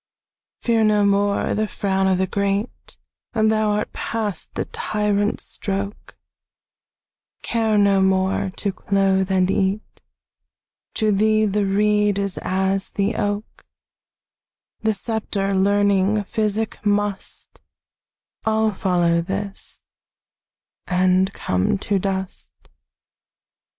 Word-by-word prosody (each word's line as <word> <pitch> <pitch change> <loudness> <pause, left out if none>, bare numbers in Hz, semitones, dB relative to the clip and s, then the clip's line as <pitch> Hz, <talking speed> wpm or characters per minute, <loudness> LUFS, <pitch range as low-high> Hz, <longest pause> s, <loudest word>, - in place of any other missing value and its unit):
Fear 230 -2 +3
no 210 -1 +3
more 200 0 +1
the 215 0 0
frown 195 -2 0
o' 190 - +3
the 190 +1 +1
great, 200 +3 -3 0.4
Thou 215 -1 +2
art 210 0 -1
past 215 -4 -4
the - - -2
tyrant's 210 0 -1
stroke; 200 0 -5 1.3
Care 220 -2 +1
no 200 -1 +4
more 190 0 +1
to 200 - -1
clothe, 195 -1 +1
and 185 0 +2
eat; 195 +2 -2 0.9
To 215 -1 +2
thee 215 +2 +3
the 205 0 0
reed 210 0 +2
is 200 -2 -2
as 190 +1 -1
the 200 +2 -1
oak: 205 +1 -3 1.2
The 220 -1 0
sceptre, 200 -2 -2
learning, 200 +1 +2
physic, 215 +2 -2
must 205 -1 -2 0.8
All 220 0 +2
follow 175 -3 +1
this 195 +3 -6 1.0
and 185 +1 +2
come 90 - 0
to 200 0 0
dust. 190 0 -4
200 Hz, 105 wpm, -22 LUFS, 190-210 Hz, 1.3 s, no